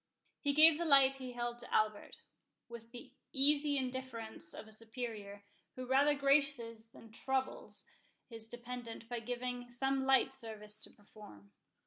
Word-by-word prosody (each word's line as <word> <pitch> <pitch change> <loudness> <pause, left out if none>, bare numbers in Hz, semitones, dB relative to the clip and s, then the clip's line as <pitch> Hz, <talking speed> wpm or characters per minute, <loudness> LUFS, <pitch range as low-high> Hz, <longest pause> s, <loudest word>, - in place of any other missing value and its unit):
He 285 - 0
gave 310 +1 +7
the 340 - -1
light 275 -3 +6
he 255 -2 -7
held 240 0 -3
to - - -9
Albert, 215 -1 0 0.5
with 235 -1 -10
the 240 -1 -11 0.2
easy 285 +1 +3
indifference 250 -8 -4
of - - -7
a - - -14
superior, 220 -3 -6 0.3
who 255 - -6
rather 275 +3 +4
graces 275 -5 +1
than 225 0 -16
troubles 265 +3 -3 0.4
his 225 -2 -5
dependent 240 -1 -8
by 240 0 -3
giving 245 +1 -4
him 245 - -14
some 270 +2 +1
slight 265 0 +4
service 215 -4 -3
to - - -9
perform. 205 - -16
245 Hz, 150 wpm, -35 LUFS, 225-270 Hz, 0.5 s, gave